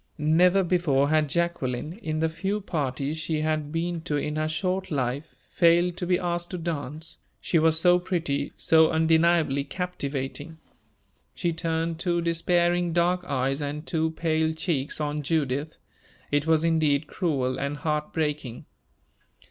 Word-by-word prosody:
Never 175 +5 +4
before 160 -6 +2
had 155 -1 +2
Jacqueline, 155 -3 -1
in 155 0 -2
the 160 - +3
few 190 +6 -2
parties 145 -5 -2
she 155 0 -1
had 155 -1 -1
been 165 +1 -2
to 160 -3 -2
in 150 +1 -2
her 155 0 0
short 185 +4 -2
life, 135 0 -2 0.2
failed 170 +1 +4
to 175 - -2
be 180 0 +3
asked 175 -1 -2
to 180 - -4
dance 160 -1 -4 0.2
she 165 - +1
was 160 0 +3
so 180 +1 +5
pretty, 165 -6 -2
so 160 -1 +5
undeniably 160 -3 +3
captivating. 145 -2 -4 0.8
She 170 -1 -1
turned 165 0 -2
two 175 -1 0
despairing 175 +1 +1
dark 175 +1 +2
eyes 135 -1 -1
and 145 +2 -4
two 160 -2 0
pale 160 0 0
cheeks 155 -4 -2
on 150 0 -2
Judith. 145 0 -1 0.5
It 145 +1 +1
was 160 -1 +3
indeed 155 -3 +2
cruel 135 -8 -1
and 140 +1 -2
heart 150 +1 -2
breaking. 150 -6 -3
160 Hz, 150 wpm, -26 LUFS, 145-170 Hz, 0.8 s, so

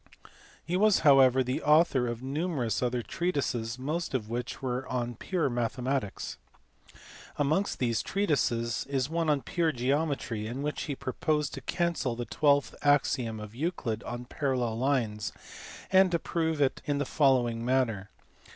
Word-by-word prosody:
He 175 - -1
was 210 +1 +4
however 130 -2 +6
the 125 +1 -2
author 150 -5 +4
of 120 +1 -4
numerous 135 - -1
other 125 -1 0
treatises, 125 - -2
most 150 +4 -3
of 110 -3 -3
which 120 +1 -4
were 130 0 -3
on 120 -1 -2
pure 175 +7 -1
mathematics. 120 -1 -2 1.0
Amongst 155 +8 +1
these 115 -3 0
treatises 120 - 0
is 135 +1 -1
one 165 -1 0
on 145 -4 +1
pure 165 +5 0
geometry 135 -4 -1
in 130 +5 -4
which 150 0 -2
he 145 - -3
proposed 150 +2 -1
to - - -6
cancel 170 -9 -1
the 120 0 -4
twelfth 145 +1 +2
axiom 135 -6 +2
of 105 0 -8
Euclid 125 - -2
on 120 0 -6
parallel 125 -5 -1
lines 120 -6 0 0.6
and 190 0 +6
to 170 - +1
prove 160 -2 -1
it 135 -2 +1
in 145 -1 0
the 145 - -1
following 125 -5 +2
manner. 120 -6 0
130 Hz, 150 wpm, -29 LUFS, 120-150 Hz, 1.0 s, however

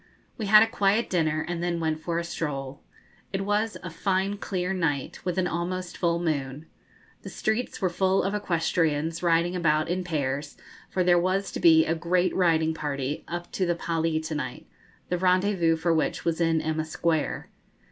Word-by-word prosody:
We 215 - -4
had 215 +2 +8
a - - +1
quiet 215 0 +1
dinner, 160 -3 +1
and 175 -1 -3
then 175 -1 -1
went 160 -1 -1
for 165 +1 -3
a 170 - -1
stroll. 140 -5 -4 0.5
It 195 - -2
was 210 +2 0
a 180 - -6
fine 190 +4 0
clear 185 -2 -2
night, 155 -7 -2
with 180 0 -2
an 185 - +2
almost 180 +1 -3
full 170 -1 +1
moon. 150 -3 -2 0.6
The - - -8
streets 220 +3 -2
were 190 - +1
full 190 +2 +2
of 195 - -1
equestrians, 165 -4 0
riding 170 +1 +2
about 155 -3 +1
in 185 +1 -1
pairs, 145 -4 -3 0.3
for 185 - 0
there 175 -1 +5
was 190 +3 0
to - - -4
be 160 -1 +6
a 165 - +1
great 175 +2 +1
riding 160 -3 +2
party 145 0 -3
up 175 0 -5
to 185 - -1
the 175 - +1
Pali 165 -1 -1
to 160 0 -5
night, 130 -5 -5 0.4
the 180 - 0
rendezvous 185 -2 +3
for 165 +1 +1
which 160 - -1
was 170 0 0
in 165 -1 +2
Emma 155 0 -1
Square. 160 -1 -1
170 Hz, 185 wpm, -26 LUFS, 160-185 Hz, 0.6 s, had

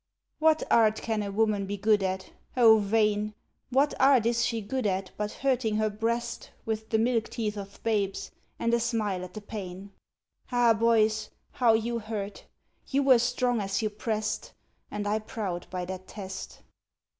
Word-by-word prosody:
What 315 0 +4
art 220 -2 +4
can 220 -2 -1
a 200 -1 -3
woman 210 -1 +1
be 205 +1 -3
good 210 +1 +3
at? 190 0 -2 0.3
O, 225 -3 +7
vain! 210 0 +1 0.3
What 275 +3 +3
art 265 -4 +5
is 235 0 +2
she 230 - 0
good 225 +3 -2
at, 190 -1 -2
but 210 0 -3
hurting 255 -5 0
her 215 0 +1
breast 235 +3 -2 0.2
With 220 0 -3
the 220 - +2
milk 230 0 +1
teeth 215 -3 -2
of 200 -1 -8
babes, 205 -3 -1 0.3
and 230 0 0
a 235 - +4
smile 215 -6 -1
at 180 +2 -9
the 215 - -6
pain? 200 -2 -7 0.6
Ah, 240 -2 +5
boys, 220 -1 +2 0.2
how 240 -3 +4
you 230 +1 0
hurt! 210 -2 -5 0.4
you 280 +1 +1
were 260 -3 +6
strong 245 -1 +1
as 195 +2 -1
you 215 - 0
pressed, 215 - -3 0.4
And 205 0 -3
I 210 +1 +1
proud 205 -5 -5
by 180 -1 -3
that 185 0 -7
test. 190 -2 -8
215 Hz, 170 wpm, -28 LUFS, 205-235 Hz, 0.6 s, O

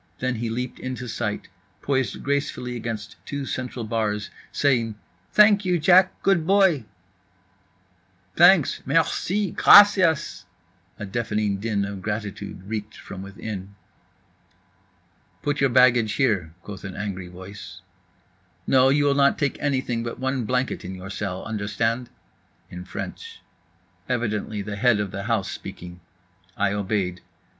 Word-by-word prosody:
Then 130 0 -1
he 115 +1 -3
leaped 125 +2 -4
into 130 -1 -5
sight, 110 -2 -3 0.4
poised 130 -6 -1
gracefully 140 -3 -2
against 115 -2 -5
two 140 -1 -5
central 125 -3 -4
bars, 105 -2 -2 0.2
saying 120 -6 +1 0.4
"Thank 210 -1 +6
you, 180 -2 +1
Jack, 185 +3 +4
good 170 -5 +2
boy"… 190 - +4 1.5
"Thanks, 175 -3 +5
merci, 165 +6 0
gracias…" 190 -7 +6 0.5
a 105 - -5
deafening 105 -1 -1
din 100 -2 -1
of 100 -1 -6
gratitude 100 -2 -5
reeked 105 +1 -5
from 95 - -9
within. 100 0 -7 1.7
"Put 145 -1 -1
your 135 - +4
baggage 120 -3 +4
in 135 - +5
here," 95 -10 -1
quoth 100 -3 -9
an 95 -2 -7
angry 95 -3 -5
voice. 95 +3 -10 0.8
"No, 130 0 +5
you 145 +1 +3
will 140 - +4
not 140 0 +3
take 140 -2 -1
anything 130 -5 -1
but 115 0 -5
one 130 -2 -2
blanket 125 +3 -1
in 95 +1 -6
your 95 +2 -8
cell, 95 -2 -4
understand." 110 +3 -2 0.6
In 90 0 -8
French. 460 - -8 0.7
Evidently 110 -4 -2
the 105 0 -5
head 115 -1 +3
of 100 -2 -2
the 100 +1 -5
house 115 -4 0
speaking. 90 0 -9 0.6
I 100 0 +1
obeyed. 95 -3 -2
115 Hz, 135 wpm, -24 LUFS, 100-140 Hz, 1.7 s, Thank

